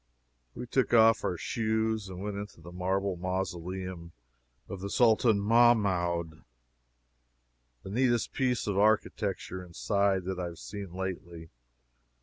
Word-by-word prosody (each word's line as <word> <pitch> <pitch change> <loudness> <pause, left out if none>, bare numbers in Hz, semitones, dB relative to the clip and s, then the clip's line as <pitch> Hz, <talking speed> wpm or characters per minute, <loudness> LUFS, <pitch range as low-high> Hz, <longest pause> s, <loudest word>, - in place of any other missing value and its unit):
We - - -5
took 125 0 +1
off 115 0 +6
our 90 - -1
shoes 110 0 -1
and 95 +1 -7
went 105 -1 -3
into 100 -3 -7
the 85 +2 -11
marble 95 +1 -1
mausoleum 90 -1 -4 0.5
of 95 - -7
the 100 - -4
Sultan 110 -1 +4
Mahmoud, 100 -7 +2 1.4
the - - -8
neatest 120 0 +1
piece 125 -3 0
of 100 -2 0
architecture, 100 -3 0
inside, 95 +2 0
that 95 0 -4
I 90 - -2
have 85 -1 -7
seen 100 -1 -7
lately. 85 -3 -6
95 Hz, 130 wpm, -29 LUFS, 90-110 Hz, 1.4 s, off